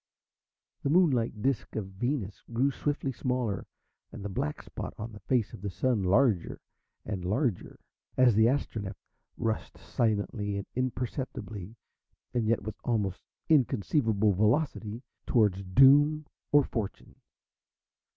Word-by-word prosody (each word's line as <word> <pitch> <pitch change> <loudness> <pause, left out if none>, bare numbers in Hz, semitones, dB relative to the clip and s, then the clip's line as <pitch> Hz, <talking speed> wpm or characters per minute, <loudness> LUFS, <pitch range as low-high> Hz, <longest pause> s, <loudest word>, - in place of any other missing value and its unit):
The - - -1
moon 170 0 +5
like 115 -4 -1
disc 135 -3 -1
of 110 - -2
Venus 105 +2 -3
grew 130 +4 +2
swiftly 140 0 -2
smaller, 125 -5 -2 0.4
and 100 - -8
the - - -2
black 75 -4 -2
spot - - -7
on 115 +2 -6
the 105 - -11
face 120 -4 0
of - - -9
the 100 - -3
Sun 120 +2 0
larger 100 -1 +2 0.5
and 95 -3 -4
larger 105 - -1 0.4
as 130 -2 +6
the 110 +2 +5
Astronef 110 -7 -1 0.4
rushed 110 -1 -2
silently 105 -2 -1
and 100 - -4
imperceptibly, 120 -5 -4 0.6
and 120 -3 0
yet 115 -2 +1
with 110 +1 -6
almost 105 -6 -1 0.3
inconceivable 115 -6 +3
velocity 110 - 0 0.2
towards 105 -5 +3
doom 140 +9 +5 0.3
or 145 0 +6
fortune. 110 -7 -5
115 Hz, 130 wpm, -29 LUFS, 100-130 Hz, 0.6 s, as